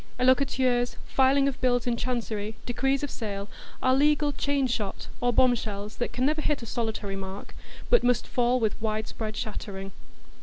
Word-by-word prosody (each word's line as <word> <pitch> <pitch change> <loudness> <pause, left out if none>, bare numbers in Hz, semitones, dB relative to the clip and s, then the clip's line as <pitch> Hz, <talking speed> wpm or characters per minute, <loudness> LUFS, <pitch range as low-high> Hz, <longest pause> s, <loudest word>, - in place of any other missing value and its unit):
Allocaturs, 255 -1 +3
filing 275 +1 +3
of 275 - -3
bills 245 -1 +2
in 240 -1 +1
Chancery, 225 -3 -2
decrees 270 +3 0
of 285 - -3
sale, 200 -3 -4 0.4
are 255 - +4
legal 295 +2 +3
chain 280 0 0
shot 220 -5 -2 0.2
or 245 0 +3
bomb 250 +1 +5
shells 210 -2 -5
that 240 - -2
can 250 - 0
never 310 +2 +1
hit 295 -5 0
a - - -5
solitary 220 -3 -3
mark, 195 +1 -7 0.4
but 485 - +6
must 245 -1 +2
fall 245 +1 +2
with 220 -1 -1
widespread 215 0 -3
shattering. 195 -2 -5
245 Hz, 165 wpm, -27 LUFS, 215-260 Hz, 0.4 s, but